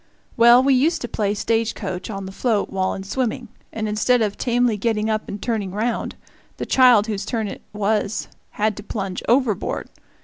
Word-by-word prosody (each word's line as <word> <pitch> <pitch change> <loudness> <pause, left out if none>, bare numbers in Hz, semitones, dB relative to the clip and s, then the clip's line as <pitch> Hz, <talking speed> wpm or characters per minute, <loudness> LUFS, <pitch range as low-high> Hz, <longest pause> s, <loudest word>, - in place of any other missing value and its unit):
Well, 240 +2 +7
we 275 0 +4
used 295 +7 +2
to 240 - -3
play 205 -3 -1
stage 225 +1 0
coach 185 -2 -5
on 195 -2 -5
the 190 - -7
float 215 +1 0
while 190 -1 -1
in 190 - -6
swimming, 240 +2 -3 0.2
and 220 -1 -3
instead 220 +3 +2
of 205 -1 -1
tamely 245 -2 +1
getting 220 +1 0
up 215 0 -2
and 205 - -5
turning 220 -4 -2
round, 225 +3 -2 0.4
the - - -4
child 250 -5 +5
whose 210 -3 -3
turn 220 0 -2
it - - -7
was 210 0 -1 0.2
had 215 0 -1
to 210 - -7
plunge 195 -4 -4
overboard. 240 -5 +1
215 Hz, 190 wpm, -22 LUFS, 205-240 Hz, 0.4 s, Well